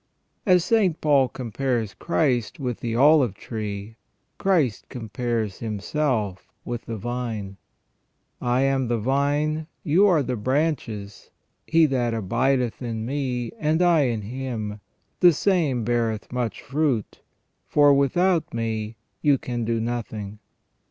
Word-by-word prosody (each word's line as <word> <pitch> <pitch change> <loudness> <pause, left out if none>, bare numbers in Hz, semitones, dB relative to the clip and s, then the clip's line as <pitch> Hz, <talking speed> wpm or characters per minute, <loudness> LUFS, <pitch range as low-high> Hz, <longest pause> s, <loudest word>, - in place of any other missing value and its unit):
As 180 -2 +5
St. 200 -8 +2
Paul 140 -4 +4
compares 120 -3 -2
Christ 130 -9 0
with 125 -4 -3
the 115 -1 -3
olive 135 - +5
tree, 105 0 -6 0.4
Christ 165 - +1
compares 115 -3 -3
Himself 110 -2 -2
with 120 -1 -5
the 115 - -4
vine: 110 -4 -4 0.8
"I 125 +1 +1
am 135 -2 +1
the 120 0 +1
vine, 145 +6 0 0.2
you 175 -1 +4
the 125 0 -2
branches; 115 -5 -2 0.4
he 165 0 +5
that 125 -5 0
abideth 120 +4 0
in 115 -2 -3
Me, 125 -3 -2
and 155 +1 +1
I 170 -5 +4
in 115 -4 -1
him, 110 -3 -4 0.4
the 175 -2 +7
same 155 - +1
beareth 115 -2 -1
much 125 -2 -3
fruit: 140 -6 -1 0.5
for 145 -1 +5
without 165 +4 +2
Me 110 -1 -2 0.3
you 145 -2 +4
can 120 -2 -3
do 115 0 0
nothing 110 -3 -4
125 Hz, 125 wpm, -24 LUFS, 110-145 Hz, 0.8 s, the